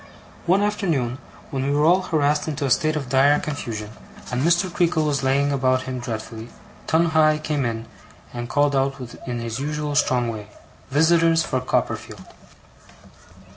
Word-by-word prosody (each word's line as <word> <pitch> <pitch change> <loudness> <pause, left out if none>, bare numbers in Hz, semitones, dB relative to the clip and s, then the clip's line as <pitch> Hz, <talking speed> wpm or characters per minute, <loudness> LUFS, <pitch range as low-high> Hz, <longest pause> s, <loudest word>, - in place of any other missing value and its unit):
One 190 +4 +4
afternoon, 160 - -1 0.3
when 135 -1 -2
we 140 - 0
were 150 +1 +3
all 180 +3 +5
harassed 150 -4 0
into 145 -2 -2
a 135 - -1
state 155 +3 +2
of 145 -4 -3
dire 140 +3 +4
confusion, 115 -8 -5 0.4
and 125 +1 -1
Mr. 175 +4 +3
Creakle 165 -3 +1
was 145 -2 0
laying 140 +2 +2
about 130 -1 +1
him 130 -1 -4
dreadfully, 115 -1 -6 0.4
Tungay 160 -2 +3
came 150 -4 -1
in, 115 -1 -3 0.5
and 120 0 -5
called 145 +2 +2
out 135 0 +1 0.3
in 120 -1 -3
his 115 0 -4
usual 150 +1 -3
strong 125 -4 +2
way: 105 -2 -8 0.4
'Visitors 165 +2 +4
for 130 - -1
Copperfield! 130 - -2
140 Hz, 155 wpm, -23 LUFS, 125-155 Hz, 0.5 s, all